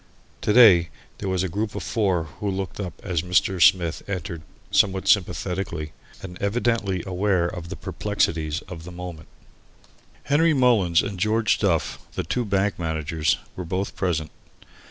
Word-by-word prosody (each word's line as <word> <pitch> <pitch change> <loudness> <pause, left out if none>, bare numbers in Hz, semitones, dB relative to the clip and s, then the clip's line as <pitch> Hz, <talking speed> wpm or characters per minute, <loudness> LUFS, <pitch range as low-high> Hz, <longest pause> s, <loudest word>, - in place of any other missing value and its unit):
To - - +1
day 105 -8 +7 0.3
there 95 - -3
was 95 -1 0
a - - 0
group 105 +4 -3
of - - -4
four 95 -7 +1 0.2
who 105 - -1
looked 95 0 -4
up 95 -3 -5
as 90 -5 0
Mr. 90 +1 +1
Smith 85 -4 +4
entered, 85 -4 -4 0.3
somewhat 95 -1 +2
sympathetically, 90 -3 0 0.3
and 90 -2 -9
evidently 100 -3 0
aware 95 -1 +1
of 85 -1 -5
the 95 - -5
perplexities 80 -6 -1
of 85 -3 -9
the 90 - -9
moment. 85 -3 -8 1.0
Henry 160 +2 +3
Mullins 110 -10 +4
and 100 -2 -5
George 110 +2 +2
Duff, 85 -6 0
the - - -2
two 120 +9 -1
bank 100 -1 0
managers, 80 -1 0 0.2
were 90 - -5
both 95 +3 -3
present. 80 -5 -1
95 Hz, 155 wpm, -24 LUFS, 85-100 Hz, 1.0 s, day